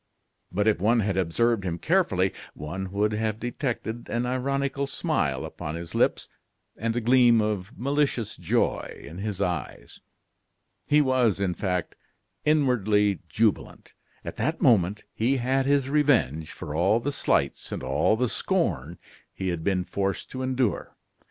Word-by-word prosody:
But 105 +4 0
if 110 - +3
one 115 +3 +3
had 100 -2 -1
observed 100 +5 +1
him 85 -2 -2
carefully, 100 - +1 0.2
one 90 +6 -5
would 105 +2 +1
have 110 0 -1
detected 120 -2 -4
an 120 +1 -1
ironical 140 +2 -1
smile 135 - -1
upon 75 - -6
his 85 0 -7
lips - - +1 0.5
and 115 +1 -2
a - - +1
gleam 120 0 +5
of 105 +1 -2
malicious 140 -3 0
joy - - -1
in 80 +6 -9
his 105 -2 -4
eyes. 90 -7 -4 0.9
He 150 +1 +5
was, 130 -7 +2
in 95 -2 0
fact, 90 -2 -2 0.5
inwardly 110 - +2
jubilant. 110 -1 -1 0.3
At - - -6
that 160 +2 -1
moment 105 -6 +3
he 125 +5 +1
had 130 +2 +1
his 140 -2 +2
revenge 130 - +2
for 75 - -7
all 90 +8 +3
the 145 +5 -2
slights - - 0
and - - -4
all - - +2
the 125 +3 +1
scorn - - -1 0.3
he 95 -1 -3
had 85 -2 -3
been 95 -1 +1
forced 95 +1 -3
to 130 - -5
endure. 130 -5 -1
110 Hz, 150 wpm, -26 LUFS, 95-130 Hz, 0.9 s, gleam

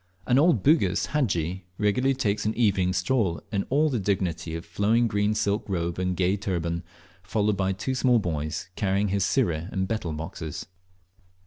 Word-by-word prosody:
An 125 +1 +4
old 155 - +4
Bugis 155 +3 +3
hadji 95 - -1
regularly 125 +6 +2
takes 105 -5 0
an 110 +1 -1
evening 100 -6 +2
stroll 90 - 0
in 100 -2 -1
all 150 +4 +3
the 130 -6 0
dignity 90 -4 -1
of 85 - -6
flowing 105 +7 +2
green 105 0 +1
silk 100 0 0
robe 85 -2 -2
and 90 -1 -1
gay 95 +2 +2
turban, 85 -4 -2 0.4
followed 105 +2 0
by 95 0 0
two 95 +8 -2
small 130 -1 +3
boys 80 -4 -3
carrying 100 0 +1
his 100 0 +1
sirih 90 - 0
and 95 -1 -1
betel 95 -6 -2
boxes. 80 0 -6
100 Hz, 165 wpm, -26 LUFS, 90-110 Hz, 0.4 s, An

